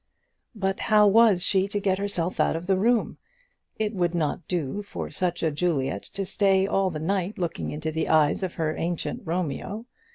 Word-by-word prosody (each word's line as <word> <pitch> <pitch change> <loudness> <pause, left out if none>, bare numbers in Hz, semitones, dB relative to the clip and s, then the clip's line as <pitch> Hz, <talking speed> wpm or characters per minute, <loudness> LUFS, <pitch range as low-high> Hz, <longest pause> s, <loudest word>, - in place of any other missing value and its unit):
But 195 -2 -1
how 210 -1 +4
was 210 -3 +5
she 195 -1 +3
to 205 +1 -2
get 195 -1 0
herself 185 -3 -2
out - - +2
of 165 +2 -4
the 190 +1 +2
room? 225 +4 +1 0.6
It 215 0 -1
would 175 -3 0
not 155 0 -2
do 175 +1 -2
for 205 - -6
such 175 -2 -1
a 160 - +2
Juliet 145 -3 -1
to 195 0 -2
stay 195 0 +2
all 195 -1 +1
the 155 -4 -5
night 190 +4 -1
looking 175 -2 -3
into 155 +1 -4
the 160 +1 -2
eyes 155 +1 +3
of 185 -2 -3
her 155 -1 -1
ancient 170 0 -3
Romeo. 180 - -3
185 Hz, 190 wpm, -25 LUFS, 165-200 Hz, 0.6 s, was